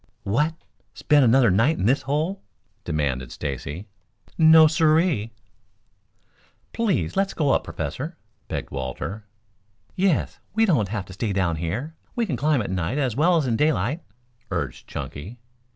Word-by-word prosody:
"What, 150 +11 +1 0.4
spend 150 -2 +4
another 120 -2 +5
night 120 - +3
in - - -1
this 130 +6 +3
hole?" 155 +8 -1 0.4
demanded 70 -6 -2
Stacy. 75 +5 -5 0.5
"No, 160 -1 +8
sirree." 155 - +2 1.4
"Please 225 -4 0
let 195 0 +2
us - - -9
go 150 -4 +1
on - - +5
up, - - -12
Professor," - - -5 0.3
begged - - -5
Walter. 75 - -5 0.7
"Yes, 185 -4 +1 0.2
we 225 0 +4
don't 180 -8 +3
want 105 -4 -1 0.2
to 95 - -11
stay 105 +1 -2
down 90 -4 0
here. 105 - -3 0.2
We 235 - +1
can 165 -11 -2
climb 140 0 +1
at 95 - -5
night 95 - -1
as 130 -6 0
well 170 +4 +4
as 155 - +1
in 120 -3 +1
daylight," 150 +2 +1 0.5
urged - - -4
Chunky. 95 +12 -7
130 Hz, 150 wpm, -24 LUFS, 95-160 Hz, 1.4 s, No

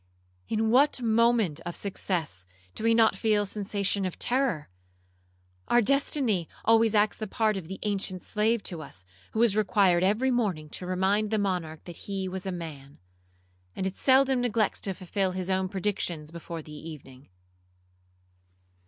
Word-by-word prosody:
in 220 0 +1
what 275 +3 +4
moment 230 -7 +2
of 175 -1 -5
success 165 - -3 0.3
do - - -4
we 230 - +4
not 225 -1 +5
feel 215 -2 +2
a - - -4
sensation 200 -1 -1
of 185 -2 -3
terror? 245 - 0 1.0
Our 240 - +4
destiny 255 - +1 0.2
always 225 0 +4
acts 210 0 +3
the 215 - -4
part 215 +1 +1
of 185 -5 -5
the 190 +2 -6
ancient 195 -3 -2
slave 220 +1 +1
to 170 -3 -4
us, 95 - -9 0.3
who - - -4
was 230 -3 +4
required 195 -4 +3
every 215 +7 +2
morning 190 -11 -1
to 180 - -6
remind 195 +3 +1
the 220 - +1
monarch 180 -6 -2
that 175 -2 -9
he 195 -1 -4
was 185 +1 -5
a - - -1
man; 150 -5 -8 0.8
and 190 - -2
it 190 0 -2
seldom 265 -1 +4
neglects 225 -3 0
to 195 -2 -2
fulfil 190 +1 -2
its 185 0 -3
own 190 0 0
predictions 180 -6 -2
before 170 -1 -7
the 150 - -12
evening. 145 -4 -11
195 Hz, 160 wpm, -28 LUFS, 175-220 Hz, 1.0 s, not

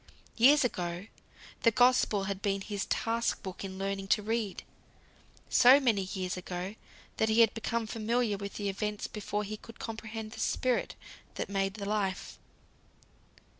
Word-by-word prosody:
Years 275 +6 +6
ago, 175 -5 -2 0.6
the 230 - +6
Gospel 245 -4 +3
had 195 0 -3
been 195 -1 0
his 205 0 -4
task 230 +1 0
book 190 0 -6
in 190 -1 -6
learning 195 0 -3
to 210 +2 +2
read. 220 -2 -2 0.8
So 255 +3 +7
many 235 -7 +2
years 185 -1 -3
ago, 180 +1 -5 0.4
that 220 - +2
he 220 +2 +5
had 225 - +5
become 230 0 -2
familiar 225 0 0
with 200 0 -6
the 205 - -3
events 210 +1 -2
before 210 0 -3
he 215 +1 -5
could 230 +1 -13
comprehend 220 -1 -6
the - - -9
Spirit 255 -1 0 0.4
that - - -3
made 195 0 -1
the 205 -2 -5
Life. 200 -2 -2
210 Hz, 155 wpm, -31 LUFS, 195-230 Hz, 0.8 s, So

